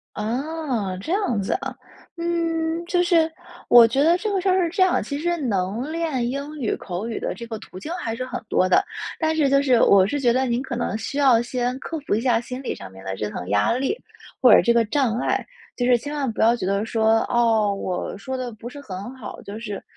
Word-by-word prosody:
哦， 245 Hz, -, -2 dB
这 320 Hz, -, -4 dB
样 380 Hz, -, 0 dB
子 195 Hz, -, -3 dB
啊。 -, -, -5 dB, 0.4 s
嗯， 335 Hz, -1 st, -1 dB
就 355 Hz, 0 st, +1 dB
是， 330 Hz, -2 st, +3 dB, 0.4 s
我 235 Hz, -1 st, +9 dB
觉 270 Hz, +5 st, +1 dB
得 340 Hz, +3 st, +4 dB
这 425 Hz, +2 st, -2 dB
个 385 Hz, -, +1 dB
事 385 Hz, -, -1 dB
儿 370 Hz, -1 st, +3 dB
是 -, -, 0 dB
这 370 Hz, +2 st, +1 dB
样， 370 Hz, -, +3 dB
其 285 Hz, -1 st, -4 dB
实 345 Hz, +2 st, 0 dB
能 225 Hz, -, -2 dB
练 310 Hz, -8 st, -1 dB
英 280 Hz, +3 st, -4 dB
语 225 Hz, -, 0 dB
口 190 Hz, +5 st, -5 dB
语 225 Hz, -, -3 dB
的 -, -, -3 dB
这 235 Hz, -, -8 dB
个 225 Hz, -2 st, -5 dB
途 185 Hz, -, -11 dB
径 305 Hz, -, -7 dB
还 230 Hz, -11 st, -3 dB
是 255 Hz, +2 st, -4 dB
很 255 Hz, -2 st, -5 dB
多 185 Hz, -, +2 dB
的， 390 Hz, -, +4 dB, 0.3 s
但 315 Hz, -1 st, +1 dB
是 300 Hz, -3 st, +2 dB
就 275 Hz, +1 st, +4 dB
是， 255 Hz, -4 st, +3 dB
我 195 Hz, -1 st, +6 dB
是 285 Hz, +6 st, -2 dB
觉 240 Hz, -3 st, +3 dB
得 260 Hz, +2 st, +1 dB
您 240 Hz, -1 st, 0 dB
可 260 Hz, -3 st, -5 dB
能 225 Hz, -2 st, -2 dB
需 275 Hz, -, -5 dB
要 265 Hz, -5 st, +5 dB
先 245 Hz, +1 st, -2 dB
克 325 Hz, +3 st, -5 dB
服 280 Hz, -, -1 dB
一 215 Hz, -, +1 dB
下 240 Hz, -2 st, +2 dB
心 250 Hz, +2 st, -7 dB
理 -, -, -3 dB
上 95 Hz, -1 st, -10 dB
面 95 Hz, -, -13 dB
的 95 Hz, 0 st, -3 dB
这 105 Hz, +1 st, -3 dB
层 90 Hz, -, -6 dB
压 105 Hz, -, +2 dB
力， 265 Hz, -, 0 dB, 0.5 s
或 -, -, +8 dB
者 -, -, +8 dB
这 235 Hz, -1 st, +2 dB
个 230 Hz, -1 st, +4 dB
障 250 Hz, -3 st, +1 dB
碍， -, -, -1 dB, 0.3 s
就 245 Hz, -, 0 dB
是 250 Hz, -1 st, +5 dB
千 290 Hz, +5 st, -6 dB
万 275 Hz, -5 st, -1 dB
不 220 Hz, -, -2 dB
要 230 Hz, +2 st, +5 dB
觉 205 Hz, -6 st, -3 dB
得 200 Hz, +2 st, 0 dB
说： 225 Hz, 0 st, +2 dB
“哦， 225 Hz, -4 st, +3 dB
我 185 Hz, 0 st, -4 dB
说 260 Hz, +5 st, -4 dB
得 250 Hz, -2 st, -4 dB
不 225 Hz, +2 st, -9 dB
是 285 Hz, +3 st, -10 dB
很 200 Hz, +1 st, -7 dB
好， 235 Hz, -, -8 dB
就 205 Hz, +2 st, -7 dB
是， 210 Hz, -3 st, -6 dB
245 Hz, 265 characters per minute, -23 LUFS, 220-300 Hz, 0.5 s, 我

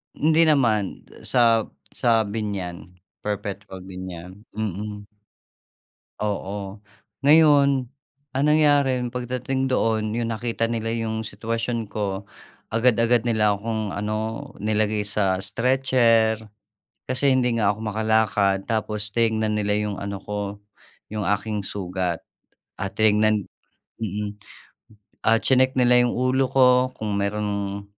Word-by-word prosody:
Hindi 160 Hz, +2 st, +3 dB
naman, 115 Hz, -10 st, +2 dB, 0.2 s
sa 115 Hz, -3 st, +3 dB, 0.2 s
sa 115 Hz, -2 st, +3 dB
Biñan, 100 Hz, -4 st, -5 dB, 0.2 s
Perpetual 100 Hz, -2 st, -5 dB
Biñan. 95 Hz, +1 st, -9 dB
Mm. 105 Hz, 0 st, -4 dB, 1.2 s
Oo. 100 Hz, -1 st, -4 dB, 0.5 s
Ngayon, 140 Hz, -4 st, +5 dB, 0.4 s
ang 135 Hz, +2 st, 0 dB
nangyari, 145 Hz, -4 st, +3 dB
pagdating 125 Hz, +2 st, -2 dB
doon, 110 Hz, -4 st, 0 dB
‘yon 115 Hz, -1 st, -1 dB
nakita 115 Hz, 0 st, -2 dB
nila 115 Hz, -1 st, -1 dB
‘yong 110 Hz, -1 st, -3 dB
sitwasyon 115 Hz, -1 st, -3 dB
ko, 100 Hz, -2 st, -3 dB, 0.5 s
agad-agad 115 Hz, +1 st, +3 dB
nila 110 Hz, -2 st, +3 dB
akong 110 Hz, 0 st, -3 dB
ano, 110 Hz, +2 st, -3 dB, 0.2 s
nilagay 105 Hz, 0 st, +1 dB
sa 100 Hz, -2 st, 0 dB
stretcher, 115 Hz, -3 st, +2 dB, 0.7 s
kasi 130 Hz, +2 st, 0 dB
hindi 130 Hz, -2 st, +3 dB
nga 105 Hz, -, +3 dB
ako 105 Hz, -, -10 dB
makalakad. 105 Hz, -2 st, +1 dB
Tapos 105 Hz, -2 st, -2 dB
tinignan 110 Hz, -2 st, +1 dB
nila 105 Hz, 0 st, 0 dB
‘yong 105 Hz, -1 st, -2 dB
ano 100 Hz, 0 st, -4 dB
ko, 105 Hz, 0 st, -4 dB, 0.7 s
‘yong 105 Hz, -1 st, -2 dB
aking 105 Hz, 0 st, -4 dB
sugat 90 Hz, -3 st, -3 dB, 0.6 s
at 100 Hz, -1 st, -3 dB
tinignan 110 Hz, -1 st, +3 dB, 0.6 s
mm. 105 Hz, -1 st, -3 dB, 0.9 s
Ah, 115 Hz, -, +5 dB
chineck 130 Hz, 0 st, +3 dB
nila 125 Hz, -1 st, +5 dB
‘yong 120 Hz, -, 0 dB
ulo 130 Hz, +2 st, +2 dB
ko, 130 Hz, -1 st, +5 dB, 0.3 s
kung 105 Hz, -2 st, -3 dB
merong 100 Hz, -1 st, -2 dB
110 Hz, 110 wpm, -23 LUFS, 105-120 Hz, 1.2 s, Ngayon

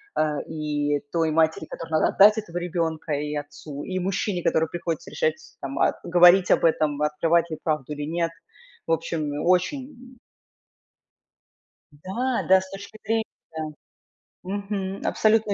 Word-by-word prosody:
а, 150 Hz, -1 st, +1 dB
и 145 Hz, -2 st, -1 dB
той 165 Hz, -2 st, +2 dB
матери, 160 Hz, 0 st, +2 dB
которой 165 Hz, +1 st, -8 dB
надо 155 Hz, -, +3 dB
отдать 210 Hz, +2 st, +6 dB
этого 175 Hz, -5 st, -4 dB
ребёнка, 165 Hz, -3 st, -2 dB
и 150 Hz, +1 st, -2 dB
отцу, 145 Hz, 0 st, -7 dB
и 185 Hz, -1 st, -3 dB
мужчине, 185 Hz, 0 st, -1 dB
которому 160 Hz, 0 st, +2 dB
приходится 170 Hz, -2 st, -4 dB
решать 155 Hz, 0 st, +1 dB, 0.3 s
там, 135 Hz, 0 st, -4 dB
а, -, -, +2 dB
говорить 175 Hz, +1 st, +6 dB
об -, -, +4 dB
этом, 155 Hz, -2 st, +2 dB
открывать 165 Hz, +3 st, +2 dB
ли 155 Hz, -, -3 dB
правду 150 Hz, -2 st, -1 dB
или 145 Hz, -, -5 dB
нет. 165 Hz, +2 st, -1 dB, 0.6 s
В -, -, -1 dB
общем, 160 Hz, -2 st, -2 dB
очень 250 Hz, +7 st, -1 dB, 1.8 s
Да-да, 190 Hz, -, +1 dB
с 190 Hz, 0 st, -10 dB
точки 200 Hz, +2 st, -9 dB
зрения 225 Hz, 0 st, +1 dB, 1.2 s
Мгм. 195 Hz, 0 st, -4 dB
Абсолютно 215 Hz, -1 st, +3 dB
170 Hz, 135 wpm, -25 LUFS, 155-195 Hz, 1.8 s, отдать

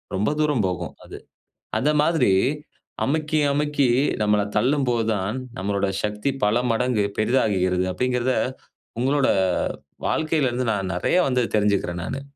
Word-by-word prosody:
ரொம்ப 100 Hz, +3 st, +1 dB
தூரம் 145 Hz, -7 st, +1 dB
போகும் 90 Hz, -1 st, -3 dB
அது. -, -, -9 dB, 0.6 s
அந்த 150 Hz, -, +2 dB
மாதிரி 160 Hz, -, +3 dB, 0.7 s
அமுக்கி, 155 Hz, +2 st, 0 dB
அமுக்கி 145 Hz, -1 st, +1 dB, 0.4 s
நம்மள 105 Hz, -1 st, +2 dB
தள்ளும்போது 125 Hz, 0 st, +1 dB
தான் 100 Hz, +4 st, -2 dB, 0.2 s
நம்முடைய 100 Hz, 0 st, -1 dB
சக்தி 105 Hz, +5 st, -1 dB
பல 105 Hz, +4 st, +2 dB
மடங்கு 115 Hz, -1 st, +1 dB, 0.2 s
பெரிதாகுகிறது. 95 Hz, -6 st, +1 dB
அப்டிங்கிறத 125 Hz, +4 st, 0 dB, 0.7 s
உங்களோட 135 Hz, +2 st, +2 dB, 0.8 s
வாழ்க்கையில 155 Hz, -3 st, +1 dB
இருந்து 125 Hz, +1 st, -2 dB
நான் 95 Hz, -3 st, -2 dB
நெறைய 90 Hz, -, 0 dB
வந்து 125 Hz, -1 st, +1 dB
தெரிஞ்சிக்குறேன் 100 Hz, -4 st, 0 dB
நானு. 135 Hz, -, -4 dB
120 Hz, 120 wpm, -23 LUFS, 100-140 Hz, 0.8 s, மாதிரி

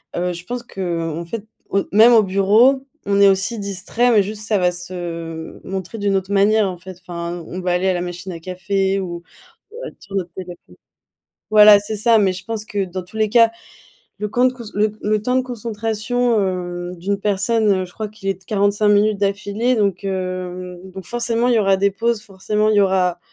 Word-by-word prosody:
Heu, 180 Hz, +1 st, -1 dB
je 175 Hz, 0 st, -9 dB
pense 245 Hz, +2 st, -5 dB
qu'en 170 Hz, -6 st, -4 dB
fait, 210 Hz, +4 st, -6 dB, 0.2 s
au 200 Hz, -, 0 dB
même 225 Hz, +4 st, +7 dB
au 220 Hz, -2 st, +6 dB
bureau, 215 Hz, +8 st, +3 dB, 0.2 s
on 200 Hz, 0 st, +2 dB
est 200 Hz, -, +8 dB
aussi 200 Hz, +4 st, 0 dB
distraits, 200 Hz, +5 st, 0 dB
mais 205 Hz, -3 st, +5 dB
juste 210 Hz, +2 st, -6 dB
ça 215 Hz, -, +2 dB
va 180 Hz, -1 st, +2 dB
se 170 Hz, -2 st, -6 dB
montrer 190 Hz, +3 st, -5 dB
d'une 200 Hz, -1 st, +1 dB
autre 190 Hz, +1 st, -4 dB
manière, 205 Hz, +1 st, +3 dB
en 180 Hz, -, -6 dB
fait. 185 Hz, 0 st, -11 dB
Enfin, 170 Hz, -1 st, -6 dB
on 185 Hz, +1 st, -6 dB
va 180 Hz, -, -1 dB
aller 180 Hz, +2 st, +1 dB
à 185 Hz, -, +3 dB
la 175 Hz, -, -2 dB
machine 180 Hz, +1 st, -6 dB
à 165 Hz, -, -7 dB
café 190 Hz, +2 st, -1 dB
ou, 175 Hz, -2 st, -5 dB, 0.5 s
heu, -, -, -7 dB
être -, -, -20 dB
sur 195 Hz, 0 st, -9 dB
notre 180 Hz, -3 st, -2 dB
téléphone 180 Hz, -1 st, -7 dB, 1.0 s
voilà 210 Hz, -1 st, +8 dB
c'est 205 Hz, +2 st, -5 dB
ça, 230 Hz, +1 st, +4 dB
mais 195 Hz, -3 st, +2 dB
je 185 Hz, +1 st, -9 dB
pense 220 Hz, -1 st, -4 dB
que 200 Hz, -3 st, -2 dB
dans 185 Hz, +1 st, -6 dB
tous 180 Hz, +5 st, -11 dB
les 215 Hz, -1 st, +1 dB
cas, 230 Hz, 0 st, +5 dB, 0.7 s
le 210 Hz, -, -3 dB
quand 245 Hz, +4 st, +1 dB
de 255 Hz, -, +1 dB
cous 240 Hz, -, -9 dB
le 210 Hz, +1 st, +1 dB
le 215 Hz, 0 st, 0 dB
temps 250 Hz, +3 st, 0 dB
de -, -, +4 dB
concentration, 230 Hz, 0 st, -1 dB
hem, 180 Hz, -2 st, -3 dB
d'une 195 Hz, +3 st, -2 dB
personne, 205 Hz, -1 st, +1 dB
je 180 Hz, -, -17 dB
crois 215 Hz, -2 st, -5 dB
qu'il 205 Hz, -2 st, -8 dB
est 195 Hz, -, +1 dB
de -, -, -22 dB
45 205 Hz, 0 st, +1 dB
minutes 205 Hz, 0 st, +3 dB
d'affilée, 205 Hz, +5 st, 0 dB
donc, 200 Hz, -3 st, 0 dB
hem, 185 Hz, -1 st, -4 dB
donc 190 Hz, -2 st, -9 dB
forcément 235 Hz, +1 st, 0 dB
il 245 Hz, -, +3 dB
y -, -, +4 dB
aura 195 Hz, -1 st, +3 dB
des 200 Hz, +1 st, +3 dB
pauses, 225 Hz, +2 st, -1 dB
forcément 210 Hz, +2 st, -1 dB
il 215 Hz, -, +2 dB
y 205 Hz, -, +6 dB
aura 185 Hz, -2 st, +2 dB
200 Hz, 215 wpm, -20 LUFS, 185-215 Hz, 1.0 s, est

